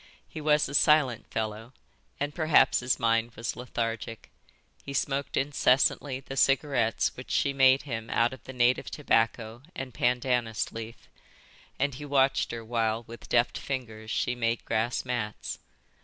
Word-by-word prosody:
He 155 Hz, -, -8 dB
was 150 Hz, 0 st, +3 dB
a -, -, -8 dB
silent 145 Hz, -5 st, +3 dB
fellow, 110 Hz, +2 st, -4 dB, 0.5 s
and 145 Hz, +1 st, -2 dB
perhaps 155 Hz, -5 st, +4 dB
his 125 Hz, 0 st, 0 dB
mind 115 Hz, 0 st, +1 dB
was 115 Hz, +2 st, -4 dB
lethargic. 115 Hz, -2 st, -4 dB, 0.5 s
He 140 Hz, -, -7 dB
smoked 140 Hz, 0 st, -1 dB
incessantly 135 Hz, -1 st, +2 dB
the 135 Hz, -, -8 dB
cigarettes 135 Hz, -4 st, +2 dB
which 125 Hz, -, -10 dB
she 140 Hz, -, +1 dB
made 135 Hz, 0 st, +5 dB
him 115 Hz, -5 st, -5 dB
out 115 Hz, +2 st, +2 dB
of 130 Hz, -, -12 dB
the -, -, -7 dB
native 125 Hz, 0 st, +2 dB
tobacco 115 Hz, -4 st, 0 dB
and 130 Hz, -2 st, -6 dB
pandanus 120 Hz, -2 st, 0 dB
leaf, 115 Hz, 0 st, -9 dB, 0.7 s
and 140 Hz, +1 st, 0 dB
he 145 Hz, +4 st, -8 dB
watched 135 Hz, -1 st, +2 dB
her 115 Hz, -1 st, -6 dB
while 115 Hz, -1 st, 0 dB
with 115 Hz, +1 st, -12 dB
deft 120 Hz, 0 st, +2 dB
fingers 110 Hz, -5 st, -5 dB
she 125 Hz, -, 0 dB
made 115 Hz, -1 st, -1 dB
grass 120 Hz, +4 st, -1 dB
mats. 105 Hz, -, -4 dB
125 Hz, 150 wpm, -28 LUFS, 115-135 Hz, 0.7 s, made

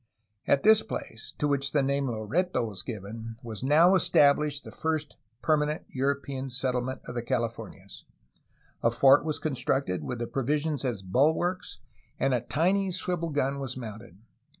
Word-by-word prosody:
At 140 Hz, -, +3 dB
this 220 Hz, 0 st, +7 dB
place, 110 Hz, -, -7 dB
to 150 Hz, -, 0 dB
which 140 Hz, -1 st, 0 dB
the 145 Hz, -2 st, +3 dB
name 140 Hz, 0 st, 0 dB
Loreto 120 Hz, -, -1 dB
was 100 Hz, -4 st, -2 dB
given, 110 Hz, +2 st, -7 dB
was 110 Hz, -3 st, -5 dB
now 155 Hz, +6 st, +5 dB
estabhshed 145 Hz, -5 st, +3 dB
the -, -, -10 dB
first 155 Hz, -2 st, -2 dB, 0.3 s
permanent 150 Hz, -1 st, +1 dB
European 135 Hz, 0 st, -2 dB
settle 125 Hz, 0 st, 0 dB
ment 130 Hz, +1 st, -5 dB
of -, -, -7 dB
the 120 Hz, -, -2 dB
Californias. 115 Hz, -4 st, -4 dB, 0.8 s
A 115 Hz, -, +4 dB
fort 135 Hz, +4 st, +5 dB
was 155 Hz, -1 st, -2 dB
constructed, 130 Hz, -, -1 dB
with 125 Hz, -, -4 dB
the 120 Hz, -, -3 dB
provisions 145 Hz, +4 st, -1 dB
as 120 Hz, -7 st, -2 dB
bulwarks, 155 Hz, -, +1 dB, 0.4 s
and 135 Hz, -1 st, +2 dB
a 125 Hz, -, +1 dB
tiny 185 Hz, +10 st, +1 dB
swivel 175 Hz, -2 st, -2 dB
gun 140 Hz, -2 st, -1 dB
was 130 Hz, -2 st, -4 dB
mounted. 110 Hz, -6 st, -9 dB
135 Hz, 155 wpm, -28 LUFS, 120-150 Hz, 0.8 s, this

